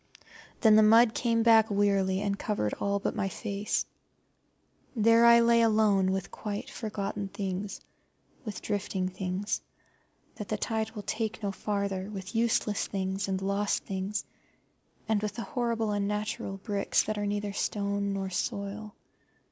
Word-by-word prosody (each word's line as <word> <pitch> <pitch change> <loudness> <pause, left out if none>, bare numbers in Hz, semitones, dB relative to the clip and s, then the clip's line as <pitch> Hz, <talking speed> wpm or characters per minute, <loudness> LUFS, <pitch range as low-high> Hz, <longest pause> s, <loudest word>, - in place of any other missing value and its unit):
Then 215 -2 +7
the - - +8
mud 225 +2 +6
came 230 -2 +1
back 225 -1 +6
wearily 200 -2 +2
and 200 -1 -1
covered 205 - -1
all 200 0 0
but 200 - -2
my 195 -2 -1
face. 205 +1 -2 1.1
There 230 +1 +5
I 235 0 +8
lay 235 0 +5
alone 215 -4 +3
with 190 -1 -3
quite 205 -2 -5
forgotten 205 -2 -4
things, 195 0 -4 0.6
with 215 -5 -6
drifting 190 -2 -2
things 185 +2 -3 0.8
that - - -6
the - - -1
tides 220 -1 -2
will 210 - -6
take 220 0 -3
no 200 - 0
farther, 200 -1 -2
with 195 -1 -7
useless 225 -2 +1
things 190 0 -2
and 190 -1 -1
lost 200 +1 0
things, 195 +1 -3 0.8
and 220 -2 +1
with 210 -1 -3
the 230 - -4
horrible 230 -3 -1
unnatural 205 -1 -2
bricks 200 0 0
that 215 -1 -3
are 205 - -1
neither 205 0 -2
stone 200 0 -1
nor 195 -1 -3
soil. 200 +3 -4
205 Hz, 150 wpm, -29 LUFS, 195-220 Hz, 1.1 s, the